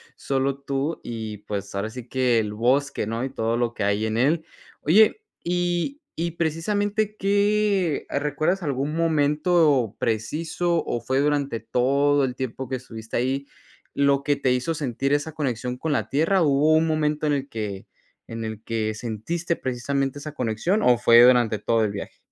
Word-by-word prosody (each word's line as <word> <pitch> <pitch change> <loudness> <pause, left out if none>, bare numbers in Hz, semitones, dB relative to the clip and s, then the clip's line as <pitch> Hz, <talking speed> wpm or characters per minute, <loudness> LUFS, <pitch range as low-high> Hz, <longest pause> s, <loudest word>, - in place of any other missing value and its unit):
solo 135 0 -1
tú 140 +3 -3
y, 110 -3 -5
pues, 100 -1 -5
ahora 100 +3 -2
sí 125 0 -9
que 125 -3 +2
el 105 -1 -2
bosque, 125 +2 +1
¿no?, 115 +3 -3
y 135 - -2
todo 115 -2 -1
lo 120 -1 -1
que 105 - -2
hay 100 +2 +1
en 110 0 -2
él. 155 +7 +2 0.4
Oye, 215 - +4 0.2
y 175 +8 -1 0.2
y 170 0 -1
precisamente, 205 +6 -1
¿qué, 200 -4 +1
ah, - - -1
recuerdas 155 +6 0
algún 140 0 -2
momento 150 - +2
preciso, 160 +9 -1
o 120 - -2
fue 130 +4 -1
durante 145 -5 0
todo 140 +4 +2
el 125 -1 -4
tiempo 130 0 -4
que 130 - -2
estuviste 115 -3 -9
ahí 135 +3 -1 0.5
lo 140 0 +2
que 145 0 +2
te 135 -2 0
hizo 125 +6 0
sentir 135 -2 -1
esa 145 +2 0
conexión 125 -4 -3
con 155 +2 -1
la - - -1
tierra, 165 +7 +2
o 160 - +3
hubo 145 +3 +4
un 160 +1 +3
momento 150 -1 0
en 145 - +2
el 140 -1 -2
que 105 -3 -5 0.4
en 115 0 -6
el 110 -1 -6
que 110 -2 -2
sentiste 125 +11 -3
precisamente 135 +2 -2
esa 150 +1 -7
conexión, 125 - 0
o 125 -1 +5
fue 115 -1 +6
durante 120 -3 +5
todo 110 +2 +1
el 105 - 0
viaje? 100 -1 -7
140 Hz, 175 wpm, -24 LUFS, 115-160 Hz, 0.5 s, fue